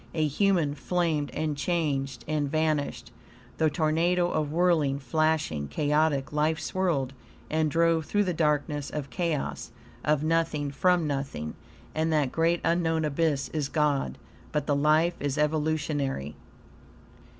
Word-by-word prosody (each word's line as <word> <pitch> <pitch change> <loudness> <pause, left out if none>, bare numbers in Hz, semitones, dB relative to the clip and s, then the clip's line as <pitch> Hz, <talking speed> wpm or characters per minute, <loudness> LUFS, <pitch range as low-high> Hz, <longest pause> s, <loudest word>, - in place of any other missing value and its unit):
A 155 -2 +2
human 165 -1 +2
flamed 155 0 -1
and 155 -1 -2
changed 140 -6 -1
and 150 -2 0
vanished. 155 -1 -1 0.5
The 160 - +4
tornado 170 +3 +1
of 150 -2 -1
whirling, 160 -5 +2
flashing, 140 - 0
chaotic 150 - +1
life 155 +2 +1
swirled 160 -6 -1 0.4
and 155 0 +2
drove 165 0 +2
through 205 +5 +1
the 180 -2 -1
darkness 150 -2 0
of 145 -3 -5
chaos 170 -6 -2 0.3
of 150 -1 +2
nothing 155 -3 0
from 175 +4 +2
nothing 135 - -3 0.4
and 160 +1 0
that 150 -4 +2
great, 165 +1 +1
unknown 165 -1 +1
abyss 150 -1 0
is 150 -3 -2
God! 150 -3 0 0.3
But 150 -2 -1
the 145 - +1
life 155 +4 +3
is 145 0 -2
EVOLUTIONARY. 150 - -1
155 Hz, 130 wpm, -27 LUFS, 145-165 Hz, 0.5 s, The